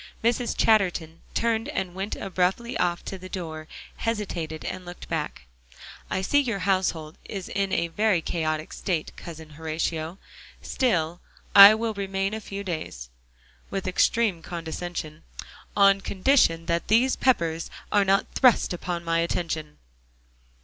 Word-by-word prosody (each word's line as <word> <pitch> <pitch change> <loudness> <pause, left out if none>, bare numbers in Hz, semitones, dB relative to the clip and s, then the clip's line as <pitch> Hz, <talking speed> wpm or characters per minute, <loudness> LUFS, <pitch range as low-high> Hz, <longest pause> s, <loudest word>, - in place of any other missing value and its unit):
Mrs. 235 +1 +1
Chatterton 180 -7 +2
turned 230 +2 +1
and 190 -10 -3
went 195 +3 -3
abruptly 195 +5 -1
off 175 -1 0
to 195 - -6
the 185 0 -9
door, 160 -4 -6 0.3
hesitated, 180 -8 -3
and 185 - -4
looked 175 0 -10
back. - - -3 0.7
"I 190 - -1
see 285 +9 +3
your 240 -7 0
household 175 -5 0
is 195 -3 -6
in 195 -1 -1
a 170 - +1
very 205 +2 +2
chaotic 155 -1 -2
state, 170 -5 -2
Cousin 160 -2 -10
Horatio. 160 +2 -3 0.4
Still 175 -10 0 0.3
I 200 +1 +11
will 225 0 -2
remain 195 0 -2
a 220 - -4
few 200 -1 -6
days," 155 - -5 0.6
with 195 -1 -3
extreme 195 0 +2
condescension, 165 -1 -5 0.6
"on 195 -1 +6
condition 190 -5 +2
that 170 0 -1
these 240 +5 +4
Peppers 170 -10 +1 0.2
are 205 -1 +4
not 195 0 +3
thrust 250 -7 +4
upon 175 -1 -4
my 165 0 +1
attention." 160 -3 -2
185 Hz, 135 wpm, -26 LUFS, 165-205 Hz, 0.7 s, I